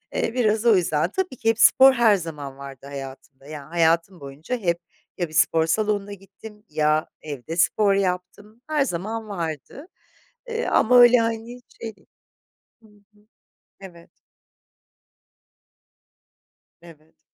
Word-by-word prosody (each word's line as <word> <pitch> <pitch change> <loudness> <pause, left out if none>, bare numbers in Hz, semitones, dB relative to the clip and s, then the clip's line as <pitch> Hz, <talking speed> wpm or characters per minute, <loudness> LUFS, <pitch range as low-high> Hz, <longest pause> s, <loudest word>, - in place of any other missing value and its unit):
Eee, 225 - -1
biraz 220 -2 0
o 225 -3 +6
yüzden 170 -2 0
tabii 370 -5 -3
ki 225 - 0
hep 225 - 0
spor 265 0 +7
her 230 -4 +4
zaman 150 -6 -7
vardı 135 -1 -11
hayatımda. 135 0 -10
Yani 145 -2 -9
hayatım 170 +1 +1
boyunca 145 - -6
hep 170 -5 -1 0.4
ya 175 -2 -2
bir - - -15
spor 160 0 +3
salonuna 205 +2 -1
gittim 205 +2 -14
ya 155 0 +1
evde 150 +2 -7
spor 200 +3 +3
yaptım. 195 +4 -3
Her 300 -3 +1
zaman 215 +3 -5
vardı, 170 - -6 0.6
eee, 465 0 -3
ama 250 +2 +4
öyle, 245 0 +7
hani, 230 +2 -3 0.2
şey 225 -1 -6 0.9
Hı 220 - -20
hı, 210 0 -27 0.6
evet. 170 -3 -13 2.7
Evet. 160 -2 -18
195 Hz, 130 wpm, -23 LUFS, 160-225 Hz, 2.7 s, spor